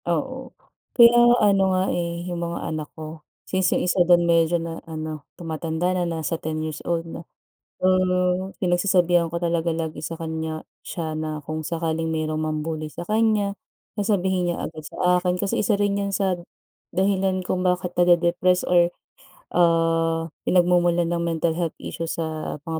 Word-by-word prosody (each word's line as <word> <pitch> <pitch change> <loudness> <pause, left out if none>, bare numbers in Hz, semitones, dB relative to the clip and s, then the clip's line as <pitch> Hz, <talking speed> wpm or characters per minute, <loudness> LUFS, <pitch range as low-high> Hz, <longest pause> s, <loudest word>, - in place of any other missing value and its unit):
Oo, - - -2 0.5
kaya 235 -1 +9 0.3
ano 200 -1 +4 0.2
nga, 185 - +2
eh, 170 0 -3
yung 175 -1 -4
mga 170 -1 -3
anak 155 -1 -4
ko 155 0 -8 0.2
since 190 -1 +1
yung - - -1
1 180 +1 +2
dun 175 -1 +6
medyo 170 0 +3
na 165 0 -5
ano 155 -2 -6
tumatanda 165 +1 -2
na 180 -1 0
nasa 165 0 -3
10 155 0 -3
years 155 -1 -5
old 170 -1 0
na. 165 0 -7 0.6
So, - - +2 0.7
pinagsasabihan 175 -2 +2
ko 170 - -2
talaga 170 -1 0
lagi 160 -2 -4
sa 165 +1 -5
kanya 160 -1 -4 0.2
siya 160 -2 -4
na 155 -1 -3
kung 155 +2 -5
sakaling 165 0 -2
mayrong 155 -1 -1
mambully 155 0 -3
sa 175 - -8
kanya, 215 -2 +2 0.4
na 205 - 0
sabihin 190 -3 +1
niya - - -5
agad 155 -1 -11
sa 180 +3 +1
akin 180 0 0
kasi 200 +1 0
isa 205 -1 +1
rin 205 -1 +1
yan 200 0 -2
sa 190 -2 +1 0.6
dahilan 190 0 +1
kung 185 0 -2
bakit 180 -1 0
nade-depressed 175 +1 +3
or, 175 -1 +4 0.6
ah, 165 -1 +2 0.2
pinagmumulan 175 -1 +3
ng 170 - -1
mental 165 -1 0
health 170 -1 -2
issues 165 -1 -5
sa 160 -2 -3
mga 160 -1 -3
170 Hz, 165 wpm, -23 LUFS, 160-180 Hz, 0.7 s, kaya